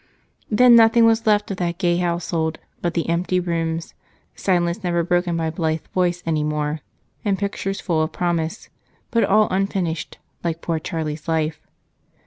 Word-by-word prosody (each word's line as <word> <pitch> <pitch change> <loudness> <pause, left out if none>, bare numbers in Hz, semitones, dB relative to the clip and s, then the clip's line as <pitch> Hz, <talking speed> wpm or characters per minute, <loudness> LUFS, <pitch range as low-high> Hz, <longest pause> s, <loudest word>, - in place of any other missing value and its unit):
Then 245 +2 +6
nothing 230 0 +6
was 225 0 +3
left 210 -1 +3
of 195 - -4
that 170 -1 -2
gay 175 -2 +1
household 170 -2 -1 0.2
but 175 -1 -2
the 170 - 0
empty 175 +2 +1
rooms, 165 -2 -2 0.4
silence 175 +1 0
never 170 -1 +1
broken 175 0 +1
by 165 - -1
a 160 - -1
blithe 160 -1 -2
voice 180 -1 +1
anymore, 150 -1 -1 0.4
and 200 -2 +1
pictures 200 -1 -3
full 165 -4 0
of 155 +1 -1
promise, 170 +3 -2 0.4
but 230 -1 +3
all 215 +2 +4
unfinished, 185 -4 -1 0.3
like 165 -1 -2
poor 165 -2 -1
Charlie's 155 -1 -4
life. 160 -1 -1
175 Hz, 155 wpm, -22 LUFS, 160-195 Hz, 0.4 s, Then